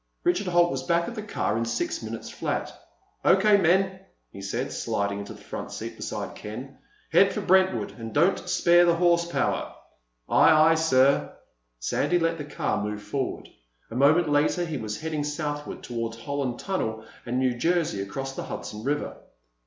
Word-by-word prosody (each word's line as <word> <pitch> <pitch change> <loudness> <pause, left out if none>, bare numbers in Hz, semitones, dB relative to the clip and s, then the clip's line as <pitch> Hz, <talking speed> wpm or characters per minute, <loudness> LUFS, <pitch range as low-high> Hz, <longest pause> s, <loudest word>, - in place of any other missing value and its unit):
Richard 350 - +1
Holt 175 -1 +4
was 135 - -2
back 170 +5 +1
at 240 - -5
the 220 - -5
car 210 - -2
again 110 - 0
in 115 - 0
six 115 0 -2
minutes 110 0 -6
flat. - - -3 0.5
"O.K., 205 +2 +5
men," 190 +1 +2 0.3
he 100 - -10
said, 95 - -3
sliding 100 0 -2
into 100 - -7
the - - -16
front - - -6
seat - - -6
beside - - -5
Ken. 125 +6 -8 0.3
"Head - - +5
for - - -3
Brentwood—and 185 -11 +1
don't 170 - +2
spare 175 0 +5
the 170 -1 +4
horsepower." 170 0 +1 0.5
"Aye, 155 0 +6
aye, - - +6
sir." 140 -4 +3 0.4
Sandy - - 0
let 165 -1 0
the 150 - -5
car 125 - -2
move 105 0 -4
forward. 135 +2 -3 0.4
A - - -6
moment 150 +6 +4
later 150 +4 +2
he 160 -3 -4
was 105 -3 -4
heading 155 -2 -2
southward 150 0 -4
toward 115 -2 -3
the 115 - -12
Holland 140 -3 -2
Tunnel 110 -13 -3 0.2
and 120 +1 -2
New 130 -1 +2
Jersey 165 - 0
across 135 +7 -5
the - - -5
Hudson 105 +1 -6
River. 145 +3 -2
145 Hz, 175 wpm, -26 LUFS, 115-175 Hz, 0.5 s, Aye